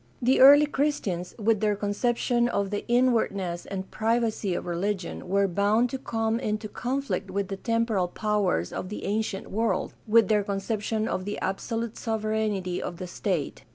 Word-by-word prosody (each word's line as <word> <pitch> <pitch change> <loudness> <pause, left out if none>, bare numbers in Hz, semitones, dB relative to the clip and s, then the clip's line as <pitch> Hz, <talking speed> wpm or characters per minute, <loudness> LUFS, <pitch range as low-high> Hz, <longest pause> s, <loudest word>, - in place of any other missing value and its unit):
The 255 +2 +3
early 285 +3 +9
Christians, 265 - -2
with 220 -1 +2
their 210 0 +1
conception 240 +4 0
of 200 -3 -1
the 205 - -2
inwardness 220 -8 +1
and 190 -1 -5
privacy 220 -4 0
of - - -4
religion, 180 +1 -3
were 200 +1 +3
bound 205 +6 +2
to 265 - -3
come 225 -1 -1
into 215 -3 -2
conflict 255 -1 -3
with 195 0 -2
the 195 - -4
temporal 230 -4 0
powers 200 - 0
of 185 - -4
the 210 - -6
ancient 205 -1 -2
world, 225 +3 0
with 225 +1 +5
their 210 -2 +3
conception 215 +2 -2
of 185 - -2
the 205 - -3
absolute 225 +4 -3
sovereignty 215 -5 -1
of 175 - -5
the 185 - -5
state. 175 -3 -3
210 Hz, 160 wpm, -27 LUFS, 195-230 Hz, -, early